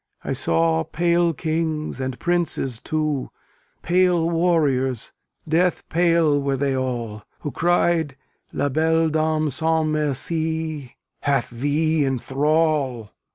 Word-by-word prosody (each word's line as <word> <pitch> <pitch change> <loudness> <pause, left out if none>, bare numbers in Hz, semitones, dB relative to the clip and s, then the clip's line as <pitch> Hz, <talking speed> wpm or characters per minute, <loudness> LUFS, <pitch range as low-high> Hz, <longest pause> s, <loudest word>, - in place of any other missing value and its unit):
I - - -2
saw 80 0 +2
pale 170 - +1
kings, 155 -2 -2
and 130 -1 -3
princes 170 -8 -1
too, 155 -3 -2 0.5
Pale 175 -1 +2
warriors, 145 -8 +1 0.4
death 175 +3 +1
pale 165 -4 +3
were 140 -1 -1
they 135 0 0
all; 120 -5 -3 0.2
Who 145 - -4
cried 170 -4 +1 0.3
"La 145 - -1
belle 160 +3 +2
Dame 155 -1 0
sans 160 +2 +1
merci 155 -1 -2 0.2
Hath 140 -4 0
thee 145 +5 +1
in 135 -1 0
thrall!" 140 -4 0
155 Hz, 110 wpm, -22 LUFS, 135-165 Hz, 0.5 s, pale